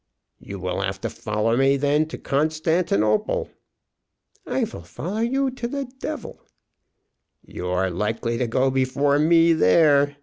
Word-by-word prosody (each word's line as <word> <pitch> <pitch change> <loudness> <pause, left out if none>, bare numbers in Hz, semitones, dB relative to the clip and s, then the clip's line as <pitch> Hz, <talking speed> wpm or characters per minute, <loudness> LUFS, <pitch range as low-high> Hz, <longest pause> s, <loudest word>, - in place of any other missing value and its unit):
"You 100 - -8
will 90 0 -3
have 95 0 -3
to - - -3
follow 110 0 -1
me 135 +2 +3
to 150 +3 0
Constantinople, 155 - 0 0.9
then." - - -5
"I - - +2
vill - - -9
follow 170 - -6
you 265 +4 0
to 250 -2 -5
the 280 +2 -4
devil." - - -6 1.0
"You 90 - -7
are 90 +1 0
likely 115 +5 -2
to 125 - 0
go 130 +3 +1
before 140 +2 +1
me 165 +2 +5
there. 145 - +4
135 Hz, 140 wpm, -23 LUFS, 105-160 Hz, 1.0 s, me